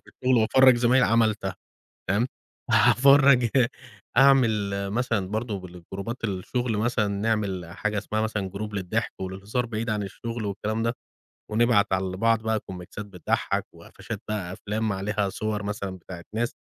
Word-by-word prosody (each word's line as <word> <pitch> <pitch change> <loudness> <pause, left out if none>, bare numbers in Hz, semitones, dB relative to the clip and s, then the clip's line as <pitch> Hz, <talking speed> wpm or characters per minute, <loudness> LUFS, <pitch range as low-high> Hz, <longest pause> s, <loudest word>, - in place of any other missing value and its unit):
في - - -43
الشغل 130 -1 +1
وأفرّج 130 +3 +6
زمايلي 125 +2 +4
عملتها 110 -4 +1 0.6
تمام؟ 110 +6 +2 0.4
أفرّج 135 -2 +6 0.7
أعمل 135 -3 +6 0.4
مثلًا 110 -3 0
برضه 110 -1 -3
بالجروبات 95 +6 -7
الشغل 110 +3 -2
مثلًا 115 -1 +1
نعمل 100 -3 -1
حاجة 105 +2 -2
اسمها 110 +1 -2
مثلًا 105 -3 -2
group 105 +1 -5
للضحك 100 +3 -2
وللهزار 100 +6 -3
بعيد 115 0 -3
عن 105 -1 -1
الشغل 115 +3 -5
والكلام 110 +3 -2
ده، 115 +1 +1 0.6
ونبعت 110 -3 +3
على 95 0 -1
بعض 115 +2 +2
بقى 110 -1 0
كُوميكْسات 95 +3 -8
بتضحك 90 -5 -1
وقفشات 110 -3 -8
بقى 95 -4 -3
أفلام 105 +2 -2
عليها 100 +1 -1
صور 105 +1 -3
مثلًا 100 -2 -4
بتاعة 85 0 -10
ناس، 120 +1 -1
110 Hz, 140 wpm, -26 LUFS, 100-115 Hz, 0.7 s, وأفرّج